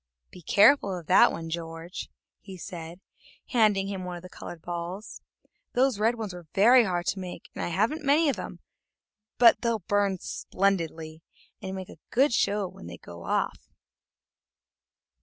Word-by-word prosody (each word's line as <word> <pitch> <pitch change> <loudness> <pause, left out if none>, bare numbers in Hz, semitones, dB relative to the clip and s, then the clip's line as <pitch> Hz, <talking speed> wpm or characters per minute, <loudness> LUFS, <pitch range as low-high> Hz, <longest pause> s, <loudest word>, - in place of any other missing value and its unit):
"Be 180 - -12
careful 200 - +4
of 170 - -9
that - - +6
one, 165 -1 -6
George," 165 +1 -6 0.3
he 190 -2 -11
said, 170 -1 -8 0.5
handing 215 -5 +3
him 195 -2 -4
one 180 -1 -5
of 175 - -10
the 180 - -10
colored 165 -2 -9
balls; 175 +4 -6 0.5
"those 255 -3 +2
red 225 +3 +2
ones 215 -5 -5
were 175 -2 -10
very 235 +5 +6
hard 175 -2 -1
to 195 - -2
make, 180 -2 -8
and - - -4
I - - -1
haven't 220 - 0
many 300 +3 +4
of 280 - +2
them, - - -8 0.8
but 235 -1 +6
they'll 230 -5 -1
burn 200 -2 +2
splendidly, 165 -5 -2 0.4
and 190 -2 -5
make 190 -1 -7
a - - -13
great 265 +1 +3
show 205 -3 +1
when 85 - -12
they 85 0 -8
go 85 0 -11
off." - - -2
190 Hz, 165 wpm, -27 LUFS, 170-220 Hz, 0.8 s, that